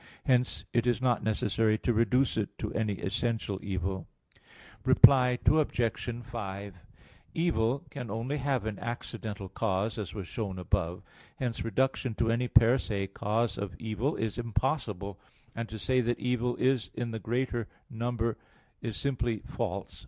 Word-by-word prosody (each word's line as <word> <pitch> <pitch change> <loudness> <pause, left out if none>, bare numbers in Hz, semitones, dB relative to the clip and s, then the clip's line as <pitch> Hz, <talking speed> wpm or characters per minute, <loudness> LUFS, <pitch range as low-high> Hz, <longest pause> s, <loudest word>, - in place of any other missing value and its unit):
Hence 125 -1 +2
it 120 0 +2
is 120 -1 +3
not 125 -2 +2
necessary 110 +1 +2
to 120 - +1
reduce 115 +4 +3
it 110 -3 -2
to - - -4
any 110 -2 0
essential 105 +1 -1
evil. 95 -2 -2 0.8
Reply 125 -2 +7
Obj. 120 -6 +2
5: 100 -4 -5 0.6
Evil 140 -6 +1
can 125 -5 -5
only 115 +7 -2
have 135 -4 0
an 110 -3 -3
accidental 110 -4 -5
cause, 105 +2 -1
as 90 -5 -5
was 95 -4 -5
shown 100 -3 -3
above 90 -1 0
(A. - - -17
1). - - -26 0.3
Hence 125 -3 -2
reduction 130 0 0
to 115 +1 +2
any 120 +2 +1
'per 115 +2 +6
se' 100 -5 -2
cause 110 0 0
of 100 -4 -4
evil 115 - -1
is 110 +1 -2
impossible. 115 - -1 0.4
And 115 0 -3
to 110 - -6
say 130 +4 +2
that 120 0 0
evil 125 -1 0
is 125 -6 +2
in 120 -1 -2
the 110 - -3
greater 120 -1 -1 0.2
number 115 -1 -1 0.4
is 115 -2 -3
simply 120 -6 -1
false. - - -4
115 Hz, 155 wpm, -30 LUFS, 105-125 Hz, 0.8 s, Reply